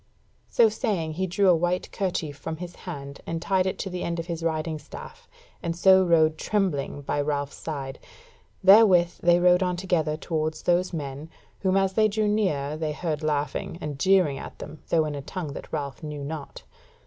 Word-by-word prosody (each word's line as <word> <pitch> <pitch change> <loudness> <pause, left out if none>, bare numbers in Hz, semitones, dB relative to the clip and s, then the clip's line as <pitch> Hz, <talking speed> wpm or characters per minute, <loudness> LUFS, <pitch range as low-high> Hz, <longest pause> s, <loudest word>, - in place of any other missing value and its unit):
So 235 - +5
saying 195 -6 -1
he 190 +4 -1
drew 195 +3 +2
a 180 - +7
white 175 +2 -1
kerchief 175 -6 -2
from 160 +3 -6
his 175 +1 -8
hand, 140 -4 -7
and 165 - -2
tied 190 +2 +1
it 190 - -2
to - - -3
the 180 0 -4
end 170 0 -2
of 165 - -3
his 170 -1 -4
riding 160 -1 -1
staff, 145 - -11 0.3
and 165 -1 -2
so 190 +2 +6
rode 160 -3 +3
trembling 175 -9 -1
by 145 - -1
Ralph's 145 -1 -2
side: 140 -4 -5 0.6
therewith 190 -3 +6
they 175 0 +5
rode 180 +1 +5
on 180 -1 +1
together 165 -4 0
towards 155 -1 -2
those 180 +1 +2
men, 145 -1 -5 0.3
whom 190 0 +2
as 195 -1 +2
they 215 +1 +4
drew 215 0 0
nearer 155 -9 0
they 155 -1 -2
heard 155 -1 -3
laughing 150 +1 -2
and 150 -5 -5
jeering 180 -6 +3
at - - -9
them, 155 - -9
though 160 -2 +3
in 150 - -3
a 140 - -5
tongue 155 0 -5
that - - -9
Ralph 140 -3 -4
knew 150 -2 -6
not. 150 0 -7
165 Hz, 195 wpm, -26 LUFS, 150-185 Hz, 0.6 s, a